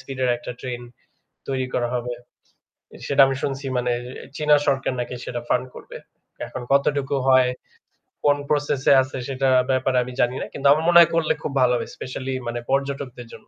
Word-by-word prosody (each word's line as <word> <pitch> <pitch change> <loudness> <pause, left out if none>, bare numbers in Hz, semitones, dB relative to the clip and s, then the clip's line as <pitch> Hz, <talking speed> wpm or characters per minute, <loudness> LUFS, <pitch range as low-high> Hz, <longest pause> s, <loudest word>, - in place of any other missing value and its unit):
Speed 135 -1 -9
এর 125 - +2
একটা 120 +1 -7
train 125 -2 -5 0.7
তৈরি 130 -1 -1
করা 120 - 0
হবে। 120 0 -3 0.9
সেটা 140 0 +2
আমি 135 0 -1
শুনছি 135 0 -3
মানে 125 0 0 0.4
চীনা 150 -1 +4
সরকার 135 -1 +1
নাকি 120 +1 -4
সেটা 120 - -4
ফান্ড - - +1
করবে। - - -10 0.5
এখন 130 - -7
কতটুকু 140 0 +1
হয় 130 -1 +5 0.8
কোন 145 0 +4
প্রসেস 145 -2 0
এ - - +9
আছে 130 0 -5
সেটার 135 -1 +1 0.2
ব্যাপারে 130 0 +1
আমি 125 - -8
জানি 125 +1 +1
না। - - -3
কিন্তু 140 - 0
আমার 155 +2 +3
মনে 175 0 +6
হয় 170 -1 +7
করলে 165 -2 +2
খুব - - -3
ভালো 125 -1 +4
হবে 120 - -3
স্পেশালী 130 +1 -5
মানে 120 0 -3
পর্যটকদের 135 -3 -2
জন্য। - - -14
135 Hz, 185 wpm, -23 LUFS, 125-140 Hz, 0.9 s, এ